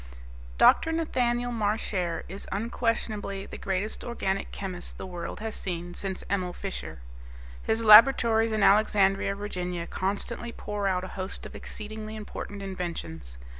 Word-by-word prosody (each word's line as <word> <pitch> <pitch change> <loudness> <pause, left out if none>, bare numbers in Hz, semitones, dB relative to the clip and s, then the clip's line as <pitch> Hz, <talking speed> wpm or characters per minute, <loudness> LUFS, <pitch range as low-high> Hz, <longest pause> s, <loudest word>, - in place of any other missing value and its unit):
Dr. 325 - +6
Nathaniel 245 -7 0
Marchare 205 -5 -1
is 195 +3 -7
unquestionably 215 -2 -1
the - - -9
greatest 195 +3 -2
organic 195 -5 -2
chemist 185 -3 -6
the - - -6
world 175 +1 -6
has 220 0 -4
seen 175 -1 -4
since 190 0 -5
Emil 185 -2 -1
Fischer. 190 - -6 0.6
His 225 +1 0
laboratories 225 0 +8
in 215 -2 +1
Alexandria, 195 -1 +4
Virginia, 180 -4 -3
constantly 205 +6 -3
pour 205 -3 -3
out 185 -1 +1
a 185 - -5
host 185 +1 -5
of - - -8
exceedingly 215 0 -7
important 205 -1 -6
inventions. 165 - -5
200 Hz, 130 wpm, -28 LUFS, 185-220 Hz, 0.6 s, laboratories